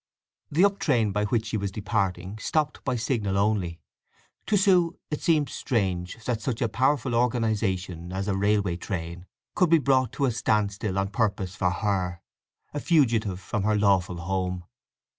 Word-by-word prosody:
The 170 +7 +4
up 200 0 +1
train 115 -8 +2
by 105 +1 0
which 115 +1 0
she 110 0 -2
was 100 -1 -3
departing 100 -1 -2
stopped 150 +5 -1
by 130 - 0
signal 110 -5 -1
only. 100 -5 0 0.7
To 210 - +3
Sue 180 -3 +3
it 150 - -2
seemed 155 -4 +2
strange 95 -3 -2
that 115 -3 -1
such 120 -1 -2
a 120 - +1
powerful 130 +3 +1
organization 105 -7 0
as 95 +1 -3
a 100 - 0
railway 100 -3 +1
train 85 -1 -5 0.3
should 180 -3 +4
be 165 - +6
brought 130 -3 +2
to 140 - 0
a 130 - +2
stand 105 -2 +1
still 100 -1 -3
on 95 0 0
purpose 100 -3 -1
for 90 -1 +1
her—a 90 +7 -4
fugitive 115 - +2
from 105 +2 -3
her 105 +2 +2
lawful 95 -4 +2
home. 90 0 -2
105 Hz, 165 wpm, -26 LUFS, 95-125 Hz, 0.7 s, be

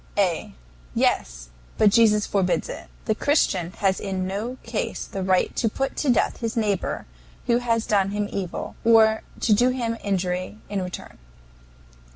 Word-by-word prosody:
A. 180 - 0 0.4
Yes. - - 0 0.3
But 210 -2 +5
Jesus 210 -2 +4
forbids 190 -3 0
it. - - -7 0.2
The 220 - +2
Christian 205 - +1
has 195 -2 +1
in 190 -2 -2
no 210 +7 -3
case 230 -1 -3
the 195 - -5
right 185 -1 +1
to 225 - +2
put 270 +5 -2
to 290 - 0
death 245 - +2
his 230 -1 -3
neighbor 205 -4 -1 0.4
who 235 0 +3
has 230 -2 0
done 195 -2 +2
him 205 0 -1
evil, 185 -3 -4
or 220 -1 +5 0.2
to 220 - +4
do 245 +5 +4
him 235 -3 -2
injury 185 0 -2
in 200 -1 -1
return. 180 -1 -7
210 Hz, 160 wpm, -24 LUFS, 190-230 Hz, 0.4 s, But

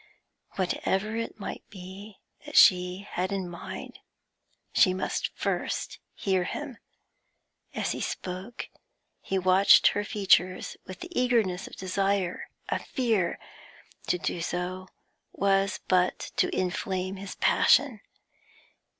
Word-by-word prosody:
Whatever 195 +3 -1
it 230 -1 -4
might 200 - -6
be 190 +2 -10 0.3
that - - -2
she 180 +2 +5
had 185 +2 -2
in 195 -2 -2
mind, 175 -1 -8 0.7
she 185 -1 +5
must 185 - -2
first - - -2 0.2
hear 190 -2 +1
him. 265 +6 -5 1.0
As - - -1
he - - -4
spoke, 185 +6 -5 0.5
he 195 - -2
watched 185 +1 +6
her 205 - -1
features 190 -4 +2
with 185 - -9
the 350 - -8
eagerness 220 -7 +1
of - - -11
desire, 195 -1 -1 0.2
of - - -1
fear; 225 - 0 0.7
to 180 - +2
do 170 0 -3
so 180 +2 -3 0.5
was 195 0 +1
but 180 -1 +1
to - - +4
inflame 185 +1 -2
his 195 0 -7
passion. 255 -8 +4
190 Hz, 115 wpm, -28 LUFS, 185-200 Hz, 1.0 s, watched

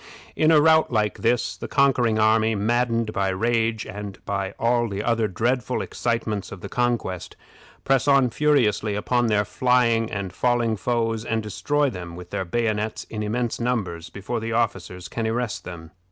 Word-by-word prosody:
In 155 - +3
a 160 -2 +6
rout 160 0 +4
like 105 -3 0
this, 115 -6 +1
the - - -7
conquering 130 -5 +2
army, 110 0 +3
maddened 115 +1 0
by 100 -3 0
rage 115 +2 0
and 100 0 -7
by 100 -1 -3
all 120 0 +1
the 100 +1 -3
other 115 -1 +1
dreadful 120 +5 -1
excitements 115 -4 -2
of 95 - -9
the - - -7
contest, 120 -7 -2 0.5
press 135 0 +2
on 135 -3 +4
furiously 115 -8 +2
upon 120 +3 +1
their 105 -1 +2
flying 115 0 +2
and 100 -3 -4
falling 120 -1 +1
foes, 115 0 -1
and 115 -1 -1
destroy 145 +7 0
them 90 -4 -7
with 90 0 -10
their 95 -2 -2
bayonets 110 +2 -1
in 110 - -4
immense 115 +3 -2
numbers 100 -9 -2
before 110 +4 -4
the 115 0 -4
officers 95 -6 -2
can 110 +6 -3
arrest 115 0 -2
them. 85 -3 -9
115 Hz, 170 wpm, -24 LUFS, 105-120 Hz, 0.5 s, a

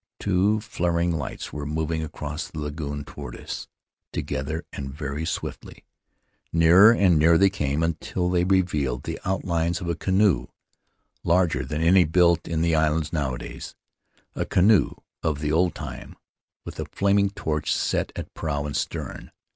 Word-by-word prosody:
Two 100 +2 +2
flaring 85 -5 0
lights 75 -6 -5
were 75 - -4
mov 80 +1 -2
ing 80 - -1
across 75 -1 -5
the - - -11
lagoon 75 -1 -4
toward - - -8
us - - -7 0.2
— - - -64
together 75 +5 -3
and 70 -1 -5
very 75 +2 -4
swiftly. 80 - -6 0.7
Nearer 85 +6 +7
and 95 -8 +4
nearer 80 +2 +6
they 95 +1 +4
came, 75 -4 -1
until 85 +2 -1
they 90 -1 +2
revealed 85 -9 +1
the - - -5
outlines 85 -3 0
of 90 - -6
a 85 - +1
canoe 95 - +2 0.8
larger 85 0 +2
than 75 +1 -3
any 90 +2 +6
built 85 +1 +3
in 80 -1 0
the 85 -1 +2
islands 80 0 +1
nowadays 65 -6 -4 0.3
— - - -39
a - - -1
canoe 100 +2 +3 0.3
of 80 -3 0
the 75 0 -1
old 85 +2 +2
time, - - -8 0.5
with - - -8
a - - -2
flaming 100 0 +2
torch 80 -6 -2
set - - 0
at - - -7
prow 70 -2 -2
and 75 -1 -4
stern. 75 - -4
80 Hz, 165 wpm, -25 LUFS, 75-90 Hz, 0.8 s, Nearer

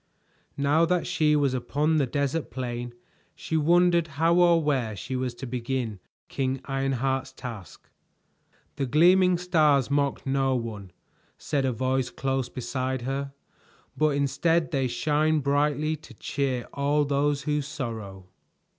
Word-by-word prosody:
Now 145 +3 +3
that 180 +1 0
she 155 -4 +2
was 140 -3 +2
upon 145 +5 0
the 140 -3 +2
desert 140 +4 -1
plain 120 -1 -5 0.4
she 160 - -4
wondered 170 +2 +3
how 165 +2 +3
or 175 -1 +5
where 130 -7 0
she 130 +8 -5
was 125 -1 -2
to 135 - -7
begin 120 -3 -3 0.3
King 135 0 -2
Ironheart's 135 -1 -1
task. 110 - -9 0.9
"The 135 - -1
gleaming 180 +6 +5
stars 155 -7 +2
mock 140 -1 0
no 135 -1 +1
one," 110 -5 -5 0.5
said 140 -2 -1
a 130 - +1
voice 130 +2 0
close 135 -2 -2
beside 130 +1 -3
her, 135 +2 -3 0.6
"but 155 -2 +2
instead 160 +4 +1
they 135 -3 +1
shine 150 +5 +1
brightly 150 +2 +1
to 140 -5 -15
cheer 130 +1 -2
all 145 +1 +1
those 145 0 0
who 150 0 0
sorrow." 110 -9 -6
140 Hz, 135 wpm, -26 LUFS, 130-150 Hz, 0.9 s, or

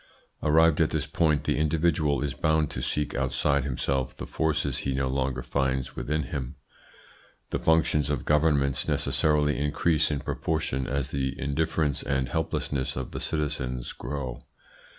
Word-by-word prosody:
Arrived 80 +1 +4
at - - +3
this - - -1
point, 75 -4 +1
the - - 0
individual 75 -2 +1
is 70 - -2
bound 80 -1 +1
to - - -4
seek 75 0 -1
outside 70 +1 +1
himself 65 0 -1
the - - -5
forces 75 -4 0
he 70 -1 -2
no 65 0 0
longer 65 -1 -1
finds 65 0 -1
within 75 +1 -1
him. 65 0 -5 1.0
The - - 0
functions 75 -3 +2
of 70 -5 -2
governments 75 -3 +2
necessarily 75 -1 +2
increase 75 +2 +2
in 75 -2 -2
proportion 70 -5 -2
as 70 0 -2
the 65 -1 -2
indifference 70 0 0
and 65 -3 -1
helplessness 65 +2 -2
of 65 -1 -4
the - - -5
citizens 65 -5 -2
grow. 65 -2 -5
70 Hz, 150 wpm, -27 LUFS, 65-75 Hz, 1.0 s, Arrived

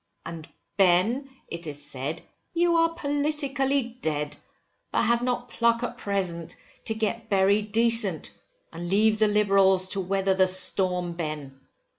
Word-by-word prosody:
And 165 -2 -8 0.3
Ben, 200 +9 +3 0.2
it 170 0 -7
is 145 -1 -6
said, 145 +2 -5 0.3
you 345 0 +3
are 330 0 +2
politically 280 -4 -1
dead, 150 -1 -2 0.6
but - - +1
have 235 0 +2
not 250 0 -2
pluck 235 0 +1
at - - -3
present, 180 -5 -3 0.3
to 220 - -2
get 225 +1 -3
buried 200 +2 +2
decent, 230 +1 +2 0.4
and 175 +1 -6
leave 215 +3 +3
the 215 - +5
Liberals 195 -3 +3
to 195 - -2
weather 195 +1 0
the 190 0 +3
storm, 185 -1 +1
Ben. 150 -5 -6
200 Hz, 140 wpm, -26 LUFS, 175-235 Hz, 0.6 s, the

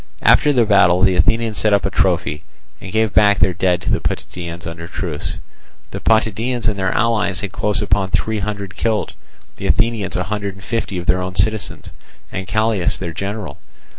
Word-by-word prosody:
After 150 - +5
the 125 -5 +3
battle 95 -3 +4
the 95 -2 +4
Athenians 110 +4 +2
set 110 -1 +2
up 100 - 0
a - - -1
trophy, 75 +2 0 0.4
and 95 - -8
gave 110 0 +1
back 100 -1 +5
their 90 +1 +3
dead 90 0 +1
to - - -1
the - - +2
Potidæans 85 +7 -5
under 85 0 -6
truce. - - -4 0.6
The - - -5
Potidæans 115 +2 +1
and 105 -2 0
their 95 -1 0
allies 105 -5 +1
had 100 -3 -4
close 105 +1 0
upon 95 -1 +1
three 110 +2 0
hundred 100 -1 -4
killed; 110 -2 -1 0.4
the - - -4
Athenians 105 +3 +1
a 90 - 0
hundred 100 0 -4
and 95 - -14
fifty 110 -3 -3
of 90 - -5
their 90 +1 +2
own 90 0 -5
citizens, 95 -2 -1 0.4
and 95 0 -5
Callias 110 -4 +1
their 85 -3 -5
general. 100 +3 -5
100 Hz, 190 wpm, -19 LUFS, 90-110 Hz, 0.6 s, After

